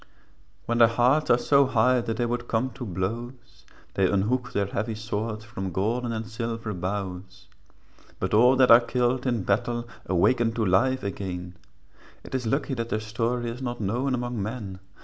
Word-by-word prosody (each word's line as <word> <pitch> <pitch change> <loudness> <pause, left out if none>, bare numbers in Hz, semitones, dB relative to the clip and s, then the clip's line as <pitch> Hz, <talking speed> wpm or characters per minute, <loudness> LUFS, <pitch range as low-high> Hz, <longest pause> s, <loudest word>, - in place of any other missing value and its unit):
When 120 0 0
their 115 - +8
hearts 125 +6 +2
are 120 - +6
so 140 +2 +4
high, 125 0 +3
That 115 -1 -3
they 120 - +1
would 120 0 -3
come 120 +3 0
to 125 -2 -7
blows, 115 +7 -5 0.3
They 95 -1 +2
unhook 120 +6 0
their 100 - 0
heavy 110 +3 -3
swords 110 0 -4
From 95 -4 -5
golden 115 +7 -1
and 110 -1 -3
silver 115 -1 -4
boughs; 95 0 -5 0.7
But - - -2
all 125 +5 +6
that 130 -2 +5
are 115 - +10
killed 125 +1 0
in 120 -5 0
battle 120 +4 -1 0.2
Awaken 115 +6 +2
to 115 -1 0
life 130 +8 +2
again; 90 -2 -5 0.7
It - - -12
is 125 -3 -1
lucky 135 +3 0
that 115 -2 -3
their 110 - 0
story 115 +2 -2
Is 125 +3 -8
not 120 -1 -4
known 120 +6 0
among 120 -2 -3
men. 105 -3 -5
115 Hz, 175 wpm, -26 LUFS, 105-125 Hz, 0.7 s, are